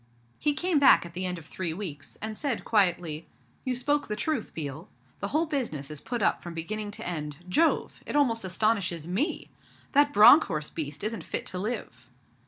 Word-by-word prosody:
He 295 -1 +1
came 345 0 +2
back 275 - +6
at 170 - -10
the 185 +1 -1
end 180 0 -2
of 165 - -11
three 165 0 -3
weeks, 155 -8 -6
and 220 0 -2
said 260 -1 -2
quietly, 175 -7 +1 0.4
'You 255 -2 -1
spoke 290 +4 0
the 210 - -2
truth, 270 +1 -2
Biel. 155 +3 -6 0.3
The 200 - -2
whole 310 +8 +1
business 230 - -3
is 150 - -7
put 240 -4 -3
up - - +2
from 175 -1 -8
beginning 210 +6 -3
to - - -6
end. 150 -4 -4
Jove! 320 - +1
It - - -4
almost 235 -7 +2
astonishes 185 -4 0
me! 210 - -2 0.4
That 290 +1 +4
Bronckhorst 210 - +6
beast 150 -1 -3
isn't 220 +1 -2
fit - - -3
to 180 - -1
live.' 185 - -5
200 Hz, 190 wpm, -28 LUFS, 165-250 Hz, 0.4 s, back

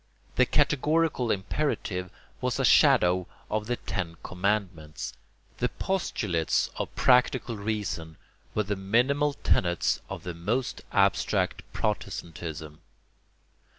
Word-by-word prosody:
The 125 0 +4
"categorical 150 -2 +2
imperative" 95 -3 -1 0.3
was - - 0
a - - +3
shadow 90 0 +5 0.2
of 105 0 -1
the 120 - 0
ten 85 -7 -4
commandments; 90 -5 -2 0.5
the - - +1
postulates 105 - 0
of - - -4
practical 125 -1 +3
reason 100 -7 -3 0.4
were 105 - +2
the 105 0 -2
minimal 125 +10 +2
tenets 85 - +1
of - - -6
the 90 - -4
most 110 +10 -2
abstract - - +2
Protestantism. 80 -3 -4
105 Hz, 105 wpm, -28 LUFS, 85-125 Hz, 0.5 s, shadow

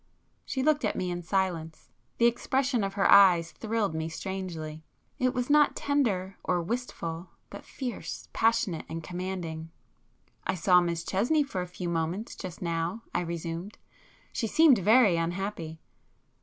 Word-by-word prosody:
She 265 - -2
looked 300 0 +2
at - - 0
me 180 -1 -2
in 175 0 -3
silence. 170 -3 -2 0.3
The 235 - +4
expression 250 0 +1
of 195 0 -3
her 200 - +3
eyes 180 -4 +7
thrilled 220 -5 -1
me 160 0 -2
strangely,—it 170 +5 -5
was 250 0 -2
not 295 0 +4
tender 205 -10 0
or 180 -1 +1
wistful, 175 -4 -4 0.2
but - - -9
fierce, 255 -4 -6
passionate 225 -7 +1
and 165 0 -5
commanding. 175 -3 -5 0.7
"I - - -1
saw 180 +1 +5
Miss 170 -1 -2
Chesney 240 - +2
for 230 -10 -4
a 180 - -4
few 180 0 -6
moments 170 +5 -2
just 180 -2 -7
now"—I 170 +5 -2
resumed,—"She 170 - -6
seemed 300 0 +6
very 210 -2 +5
unhappy." 165 -1 -3
185 Hz, 140 wpm, -28 LUFS, 170-230 Hz, 0.7 s, eyes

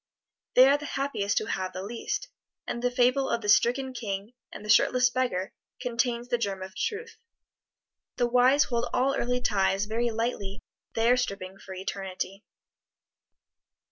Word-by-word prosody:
They 255 +1 +9
are 285 +1 +4
the 295 - -6
happiest 270 -8 -1
who - - +1
have 185 -2 -3
the 185 - -5
least; 235 - -4 0.4
and 235 - -4
the 245 - +2
fable 250 +2 +2
of 235 - 0
the 210 - -5
stricken 255 +5 +3
king 205 -2 -4 0.2
and 210 - -9
the - - -8
shirtless 250 +3 +5
beggar 245 -8 -1 0.3
contains 240 -1 -1
the 240 - +1
germ 195 -4 -2
of 190 0 -9
truth. 460 +1 -3 1.0
The 245 - +2
wise 250 +4 +5
hold 235 -1 -1
all 265 +2 +2
earthly 250 0 0
ties 195 -2 +1
very 230 +3 0
lightly 220 -3 -3 0.3
they 230 +1 +3
are 250 - +5
stripping 195 -5 -3
for 190 -1 -9
eternity. 190 +1 -5
235 Hz, 160 wpm, -28 LUFS, 200-250 Hz, 1.0 s, They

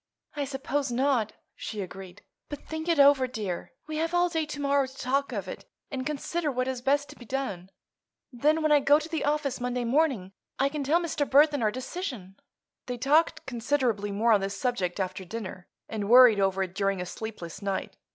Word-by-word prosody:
"I 290 -1 -1
suppose 280 0 -2
not," 245 -3 +1 0.2
she 215 - -6
agreed. 190 -1 -8 0.3
"But 290 - -7
think 315 +1 -5
it 335 - +3
over, 280 -2 +6
dear. 210 -7 -5
We 310 0 -5
have 330 +2 -1
all 350 0 +3
day 320 -3 -1
to 295 -1 -6
morrow 280 -1 +2
to 265 +1 -15
talk 275 +2 0
of - - -4
it - - -7 0.3
and 265 -1 -3
consider 305 +2 -2
what 255 0 -1
is 260 -2 -3
best 285 +2 +1
to - - -11
be - - -13
done. 220 -8 -4 0.6
Then, 305 +6 +2
when 310 - +2
I 295 - +7
go 285 +1 +5
to 310 +1 -5
the 325 -1 -2
office 290 -3 -1
Monday 250 0 -1
morning, 250 -7 +1 0.3
I 275 +1 +2
can 295 0 -3
tell 305 +5 +3
Mr. 310 -4 -2
Burthon 290 0 +5
our 215 - +3
decision." 255 - -6 0.5
They 250 -1 -3
talked 295 +7 +2
considerably 240 -4 0
more 220 +4 +2
on 210 -3 +5
this 195 0 -3
subject 195 -8 -1
after 185 0 -3
dinner, 185 -2 -7 0.2
and 210 -2 -4
worried 245 -3 +8
over 195 0 +2
it 185 -1 -6
during 195 -1 0
a 180 - -3
sleepless 190 -3 -7
night. 195 -1 -3
255 Hz, 200 wpm, -28 LUFS, 205-290 Hz, 0.6 s, worried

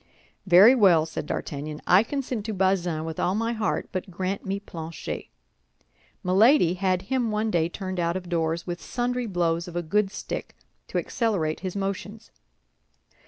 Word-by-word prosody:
"Very 190 +7 +8
well," 185 -10 +5
said 160 -2 -5
D'Artagnan, 150 +1 -4
"I 180 +2 +6
consent 250 -2 -3
to 215 - -3
Bazin 180 -4 +1
with 160 -1 -5
all 185 - +1
my 230 +2 0
heart, 215 -3 -1
but 185 +1 -4
grant 185 +2 -3
me 195 +1 -2
Planchet. 165 -5 -6 1.0
Milady 190 - +5
had 185 0 0
him 245 +2 0
one 215 +1 0
day 165 -2 +1
turned 185 0 -5
out 170 +1 0
of 180 -1 -8
doors, 165 -1 -1
with 175 -1 -5
sundry 245 0 -2
blows 170 -3 0
of 175 - -9
a 175 - -1
good 200 +5 +1
stick 210 - -6 0.3
to - - -3
accelerate 190 -10 -1
his 185 0 -5
motions. 200 +3 -4
185 Hz, 165 wpm, -26 LUFS, 170-215 Hz, 1.0 s, Very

